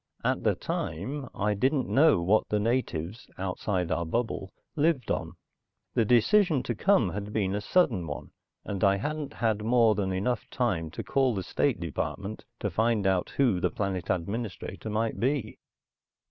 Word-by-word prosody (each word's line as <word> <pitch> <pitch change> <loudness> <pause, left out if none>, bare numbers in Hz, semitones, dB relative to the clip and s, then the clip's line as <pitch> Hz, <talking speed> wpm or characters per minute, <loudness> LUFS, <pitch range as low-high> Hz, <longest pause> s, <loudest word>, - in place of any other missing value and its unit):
At - - 0
the - - +3
time, 130 - -4
I 105 +1 +1
didn't 130 +6 +1
know 145 - +4
what 105 +5 +3
the 105 - +1
natives, 110 -4 -2
outside 90 -1 -2
our 85 - +1
bubble, 95 +1 -2 0.2
lived 150 -5 +1
on. - - -2 0.6
The 115 - +2
decision 135 - +4
to 120 - -2
come 120 - +3
had 105 +1 -5
been 100 -3 0
a 105 - -1
sudden 110 - +2
one, - - -6 0.3
and 100 -1 -3
I 100 -1 +5
hadn't 150 +6 -4
had 110 -2 0
more 115 -1 +4
than 100 -2 -1
enough 105 +6 -1
time 95 - -1
to - - -6
call 135 -4 +2
the 95 - -2
State 130 +3 0
Department 95 +5 -4 0.2
to - - -1
find 110 -2 +1
out 95 -2 +2
who 125 -10 +3
the - - +1
planet 95 -3 -3
administrator 100 +2 -3
might 110 +1 -1
be. 130 -3 -1
110 Hz, 165 wpm, -28 LUFS, 95-125 Hz, 0.6 s, I